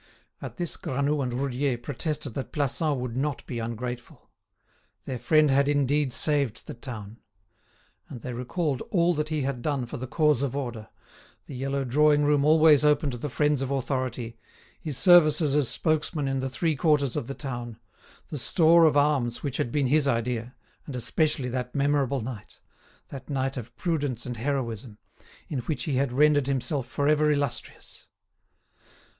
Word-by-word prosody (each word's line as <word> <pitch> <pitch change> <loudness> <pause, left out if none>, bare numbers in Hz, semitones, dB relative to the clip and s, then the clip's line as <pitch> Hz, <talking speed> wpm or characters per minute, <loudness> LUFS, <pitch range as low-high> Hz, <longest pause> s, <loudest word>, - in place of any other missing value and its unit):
At - - -8
this 175 -3 -3
Granoux 140 +3 -1
and 125 -2 -2
Roudier 130 0 -1
protested 145 +2 -4
that 135 - -5
Plassans 145 +1 0
would 125 -2 -4
not 140 +1 -2
be 120 - -5
ungrateful. 120 +1 -6 0.7
Their 130 -2 -4
friend 155 0 +4
had 140 +1 +3
indeed 145 -1 +1
saved 140 -4 0
the - - -7
town. 115 -3 -8 0.9
And 120 - -8
they 125 - -5
recalled 135 +3 -2
all 175 -2 +3
that 150 -1 -2
he 155 -2 -1
had 130 -2 -3
done 140 -2 -1
for 120 - -7
the 130 +1 -6
cause 150 -1 +2
of 140 -2 -2
order: 120 -6 -5 0.6
the - - -10
yellow 135 +2 -2
drawing 150 +3 +3
room 145 -1 +3
always 155 -2 +6
open 150 -1 +3
to 120 - -5
the 145 +5 -4
friends 150 0 +1
of 135 - -2
authority, 130 -4 -3 0.4
his 150 -5 -5
services 155 -4 +5
as 145 -4 +2
spokesman 155 -2 -1
in 135 0 -1
the 130 0 -2
three 160 +4 0
quarters 140 -3 +2
of 115 - -3
the 135 - -5
town, 120 -5 -6 0.5
the 150 - -4
store 165 +5 +5
of 150 -2 +4
arms 140 -5 +1
which 140 -2 -2
had 120 - -1
been 145 0 +1
his 145 +2 +2
idea, 120 0 -1 0.3
and 140 - -6
especially 145 +2 0
that 125 +1 -4
memorable 140 -2 +1
night—that 130 +3 -11
night 135 -1 -1
of 120 -2 -8
prudence 145 -8 -2
and 125 -1 -5
heroism—in 120 +1 -5
which 135 +3 -3
he 140 -4 -1
had 135 -1 +1
rendered 145 +1 +3
himself 135 0 -1
forever 150 +3 +2
illustrious. 140 -4 -4
140 Hz, 165 wpm, -26 LUFS, 125-150 Hz, 0.9 s, always